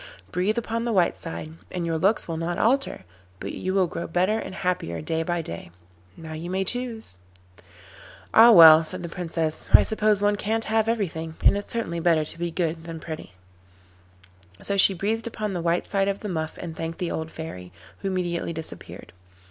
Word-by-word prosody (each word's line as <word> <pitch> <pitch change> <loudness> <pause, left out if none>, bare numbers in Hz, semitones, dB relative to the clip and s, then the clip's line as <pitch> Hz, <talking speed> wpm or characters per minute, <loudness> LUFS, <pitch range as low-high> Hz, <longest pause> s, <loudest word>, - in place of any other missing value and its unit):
Breathe 190 +6 0
upon 230 0 -2
the 240 - -1
white 185 -5 +3
side 165 -1 -7 0.2
and 180 -2 -3
your 165 -1 -1
looks 195 +6 +2
will 165 - -3
not 170 +2 -2
alter, 250 - +1 0.3
but 100 - -5
you 185 +1 -3
will 190 -2 +4
grow 170 0 -5
better 185 +6 +1
and 190 - -7
happier 175 - -2
day 160 - -2
by 175 0 -1
day. 85 - -7 0.5
Now 160 -1 -8
you 165 +3 -6
may 190 +1 0
choose.' 225 - -4 1.1
'Ah 230 +2 +9
well,' 165 -6 +10
said 180 +2 -3
the 170 - -5
Princess, 165 -2 -3
'I - - +9
suppose 215 -2 +1
one 205 0 +2
can't 225 +2 -1
have 220 0 +1
everything, 165 -8 -2
and - - +6
it's 205 - -4
certainly 195 -8 -3
better 165 -2 +2
to 165 - -6
be 175 0 -1
good 165 -1 -2
than 165 -1 -6
pretty.' 155 - -8 1.2
And - - -6
so 200 - +1
she 195 0 +5
breathed 220 +5 -2
upon 215 -3 -3
the 175 - -2
white 170 +1 0
side 195 -1 0
of 200 0 -2
the 210 - -4
muff 160 -3 -3
and 165 -2 -6
thanked 165 0 -5
the 175 - -3
old 160 0 -3
fairy, 90 - -8 0.3
who 195 - -4
immediately 175 -3 -2
disappeared. 160 - -8
175 Hz, 195 wpm, -25 LUFS, 160-205 Hz, 1.2 s, well